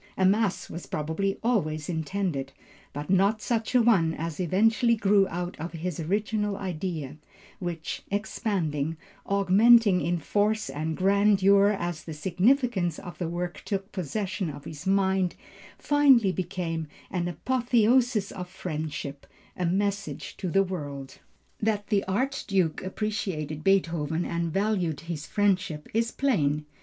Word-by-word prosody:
A 190 - +3
mass 200 0 +2
was 170 - -8
probably 160 +6 -2
always 155 -11 0
intended, 160 -4 -2 0.4
but 145 +4 -5
not 200 +3 +3
such 230 +2 -1
a 245 - +6
one 175 -9 +3
as 165 +1 -5
eventually 220 +6 +3
grew 200 -2 +3
out 175 0 -4
of 165 +3 -5
his 170 0 -4
original 205 +4 -1
idea, 160 -6 -4 0.4
which, 170 -3 -4
expanding, 175 - -1 0.3
augmenting 200 +1 +5
in 170 +3 0
force 210 +6 0
and 155 +1 -3
grandeur 200 0 +4
as 175 -2 -3
the 160 - -7
significance 190 - +1
of 175 -4 -9
the 175 -3 -2
work 175 +1 -4
took 195 0 -3
possession 190 0 -3
of 145 -1 -9
his 160 +3 -8
mind, 190 -2 +2 0.4
finally 275 -9 +4
became 175 -3 -3 0.2
an 175 -2 -1
apotheosis 240 - +2
of 180 -2 -7
friendship, 150 -5 -5 0.3
a 180 - -1
message 200 +2 -2
to 185 - -3
the 195 +3 +3
world. 145 -7 -6 0.4
That 210 -1 0
the 205 -3 +2
Archduke 195 - 0
appreciated 185 -7 -3
Beethoven 170 -4 +1
and 170 -1 -2
valued 190 -6 0
his 165 -2 -6
friendship 190 -7 0
is 230 +1 +1
plain. 150 - +1
185 Hz, 130 wpm, -27 LUFS, 165-205 Hz, 0.4 s, a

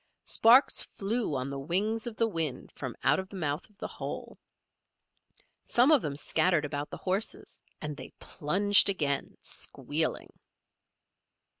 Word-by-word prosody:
Sparks 245 +5 +5
flew 210 -4 -2
on 130 +1 -3
the 140 - -4
wings 205 - 0
of 235 - -5
the 230 - +1
wind 165 - -2
from 130 -4 -6
out 145 +5 +3
of 190 0 -6
the - - -10
mouth 155 -1 -3
of 210 - -29
the - - -5
hole. - - -7 1.2
Some 250 +5 +3
of 295 -5 +6
them 145 -2 -4
scattered 160 +2 +2
about 145 0 -4
the - - -7
horses 195 +3 -3 0.2
and 150 -1 -4
they 130 -2 -10
plunged 200 +7 +3
again, 145 -7 -1
squealing. - - -2
180 Hz, 145 wpm, -29 LUFS, 145-210 Hz, 1.2 s, of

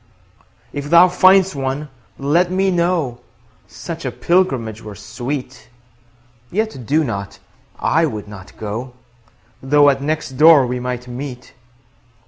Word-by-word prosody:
If 145 0 -5
thou 170 +3 +7
find'st 190 +1 +4
one, 135 +2 -3 0.3
let 165 +6 +1
me 190 +1 +1
know; 170 -8 0 0.5
Such - - -8
a - - -2
pilgrimage 130 - 0
were 105 -1 -9
sweet. 125 +4 -6 0.8
20 185 - -9
Yet 215 - -2
do 155 +2 +2
not; 100 -5 -5 0.4
I 160 +1 +2
would 105 -7 -6
not 95 -3 -12
go, 110 +4 -5 0.7
Though 145 +1 +5
at 135 0 -4
next 150 -2 -3
door 155 -4 +8
we 125 0 -3
might 125 0 -4
meet. 125 -1 -8
135 Hz, 130 wpm, -19 LUFS, 120-165 Hz, 0.8 s, door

